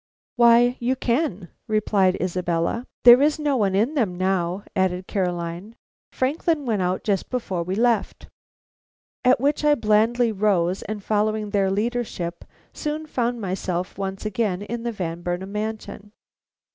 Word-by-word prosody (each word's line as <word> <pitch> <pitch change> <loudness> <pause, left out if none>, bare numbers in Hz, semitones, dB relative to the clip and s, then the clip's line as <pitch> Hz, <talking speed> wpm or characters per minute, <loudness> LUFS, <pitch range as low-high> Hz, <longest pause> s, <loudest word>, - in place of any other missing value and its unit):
"Why, 240 +1 +5
you 245 +2 0
can," 235 - -1 0.2
replied 205 -4 +2
Isabella. 180 +5 -1 0.2
"There 245 +2 +9
is 295 +2 +3
no 295 -2 0
one 200 -6 +1
in 225 +9 +2
them 215 - 0
now," 185 0 0
added 185 -1 0
Caroline, 180 +2 -3 0.4
"Franklin 295 +3 0
went 220 -5 0
out 180 +1 -1
just 200 -3 -1
before 195 -8 -2
we 180 +3 -3
left." 230 -1 0 1.0
At 255 -1 +4
which 285 +3 0
I 295 0 +5
blandly 225 +1 +2
rose, 190 -3 +1
and 210 -2 -6
following 215 0 0
their 200 -2 +2
leadership, 205 -5 -2 0.3
soon 305 +1 -4
found 240 -5 -2
myself 185 -1 -3
once 195 +1 -4
again 205 -2 -1
in 230 +3 -5
the 235 0 -2
Van 175 -5 -4
Burnam 180 +2 -4
mansion. 210 -1 -5
210 Hz, 145 wpm, -23 LUFS, 185-240 Hz, 1.0 s, There